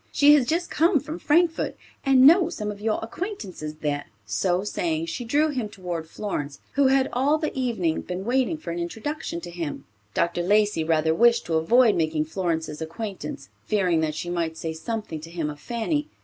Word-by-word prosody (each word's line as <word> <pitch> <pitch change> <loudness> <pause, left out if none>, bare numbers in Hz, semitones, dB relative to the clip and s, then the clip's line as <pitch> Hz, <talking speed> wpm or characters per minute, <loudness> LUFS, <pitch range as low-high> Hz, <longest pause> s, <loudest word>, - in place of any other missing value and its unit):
She 290 +1 +6
has 275 -5 +4
just 345 +4 -1
come 330 0 +3
from 305 +5 -7
Frankfort 330 +2 +2 0.3
and 265 -1 +6
knows 340 +3 +6
some 210 -1 -3
of 205 0 -10
your 215 0 +1
acquaintances 225 - -5
there." 145 -1 -1 0.2
So 175 - 0
saying, 165 -5 -1
she 165 +8 -4
drew 290 +7 +2
him 250 -7 -2
toward 175 -5 -5
Florence, 145 -10 -4
who 280 -1 +3
had 265 0 +3
all 275 +5 +3
the 310 -1 -3
evening 225 -11 0
been 180 +2 -5
waiting 260 +6 +1
for 305 - -6
an 170 - -3
introduction 220 - -4
to 175 0 -8
him. 170 -4 -5 0.3
Dr. 170 0 +1
Lacey 205 -1 +2
rather 160 0 +2
wished 235 +6 +4
to 165 - -3
avoid 220 +9 +5
making 155 -2 0
Florence's 160 -3 -2
acquaintance, 205 - -6 0.2
fearing 185 -6 +2
that 155 -1 -1
she 175 +2 -4
might 165 -2 -2
say 160 0 -3
something 185 -1 -4
to 165 - -9
him 165 -3 -3
of 145 - -11
Fanny. 290 - -2
205 Hz, 190 wpm, -25 LUFS, 165-265 Hz, 0.3 s, She